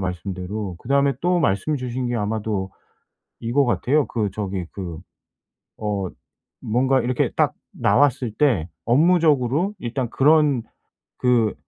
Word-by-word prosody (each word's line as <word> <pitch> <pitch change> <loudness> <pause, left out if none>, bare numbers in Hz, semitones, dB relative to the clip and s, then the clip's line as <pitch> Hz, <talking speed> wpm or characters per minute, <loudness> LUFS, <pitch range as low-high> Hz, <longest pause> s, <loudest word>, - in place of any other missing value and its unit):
말씀대로. 95 +2 -4
그다음에 140 +2 +2
또 180 +1 +2
말씀 140 +2 +1
주신 125 -1 -3
게 120 - -1
아마도 105 -3 -2 0.7
이거 125 +5 +2
같아요. 125 - +1
그 105 -4 -2
저기 95 -3 -4
그 85 -5 -6 0.8
어 105 -3 -2 0.5
뭔가 130 +4 +2
이렇게 125 +1 0
딱 - - +2 0.2
나왔을 130 -3 +2
때 115 - +1 0.2
업무적으로 155 - +3
일단 120 -2 -3
그런 145 -2 +4 0.6
그 120 -4 +2
120 Hz, 240 characters per minute, -22 LUFS, 100-140 Hz, 0.8 s, 그런